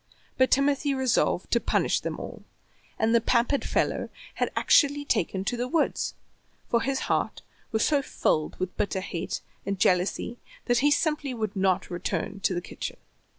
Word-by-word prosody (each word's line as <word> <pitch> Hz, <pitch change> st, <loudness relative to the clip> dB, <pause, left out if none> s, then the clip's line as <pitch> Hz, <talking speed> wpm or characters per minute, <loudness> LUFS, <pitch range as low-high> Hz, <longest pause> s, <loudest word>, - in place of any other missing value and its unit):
But 260 Hz, 0 st, +4 dB
Timothy 280 Hz, +1 st, +2 dB
resolved 260 Hz, -8 st, +1 dB
to 235 Hz, -, +4 dB
punish -, -, +1 dB
them -, -, -4 dB
all, -, -, -8 dB, 0.5 s
and 225 Hz, +1 st, +2 dB
the 235 Hz, -, +5 dB
pampered 240 Hz, +4 st, +2 dB
fellow -, -, 0 dB, 0.2 s
had -, -, -1 dB
actually 285 Hz, 0 st, +4 dB
taken 190 Hz, -, 0 dB
to 245 Hz, -, 0 dB
the 245 Hz, +1 st, -2 dB
woods, 310 Hz, +4 st, 0 dB, 0.5 s
for 235 Hz, -, +2 dB
his 270 Hz, 0 st, -1 dB
heart -, -, -1 dB, 0.3 s
was 220 Hz, 0 st, +2 dB
so 290 Hz, -2 st, +3 dB
filled 155 Hz, -, -1 dB
with 185 Hz, 0 st, -3 dB
bitter 195 Hz, -2 st, -1 dB
hate 180 Hz, -1 st, -4 dB, 0.2 s
and 200 Hz, 0 st, -2 dB
jealousy 185 Hz, +7 st, +1 dB, 0.3 s
that 245 Hz, 0 st, +3 dB
he 290 Hz, +3 st, +4 dB
simply 295 Hz, -3 st, +1 dB
would 215 Hz, -3 st, -3 dB
not 190 Hz, -2 st, +1 dB
return 185 Hz, +3 st, -3 dB
to 190 Hz, -, +1 dB
the 175 Hz, -, -1 dB
kitchen. -, -, -6 dB
235 Hz, 165 wpm, -27 LUFS, 195-275 Hz, 0.5 s, the